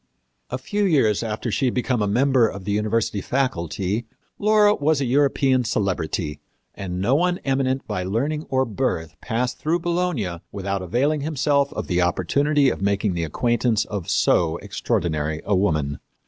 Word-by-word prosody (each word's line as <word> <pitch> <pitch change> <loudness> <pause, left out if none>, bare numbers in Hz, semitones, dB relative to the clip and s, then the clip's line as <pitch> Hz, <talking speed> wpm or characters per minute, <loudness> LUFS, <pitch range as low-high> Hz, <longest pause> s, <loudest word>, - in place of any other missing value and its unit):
A - - -2
few 205 0 -2
years 135 - +3
after 115 +1 -3
she 135 - 0
had 125 - 0
become 125 -2 0
a 105 - +1
member 125 +2 +3
of 100 -2 -7
the 100 - -1
university 105 0 0
faculty 105 - -1 0.3
Laura 210 0 +5
was 150 -3 +1
a 140 - 0
European 135 0 +2
celebrity, 90 -8 -2 0.3
and 90 -2 -5
no 110 +8 +2
one 175 +4 +2
eminent 135 -1 0
by 90 - -3
learning 135 - -2
or 130 0 +2
birth 100 - -2
passed 125 +1 -2
through 160 +3 +1
Bologna 170 - -1
without 100 0 -3
availing 135 - 0
himself 145 -1 +1
of - - -4
the 90 -1 +1
opportunity 140 - +2
of - - -5
making 100 0 +1
the 85 -1 -2
acquaintance 120 - +1
of 100 -5 -5
so 85 -1 +2
extraordinary 80 -3 -2
a 105 - +2
woman. 75 -7 0
115 Hz, 160 wpm, -23 LUFS, 95-140 Hz, 0.3 s, Laura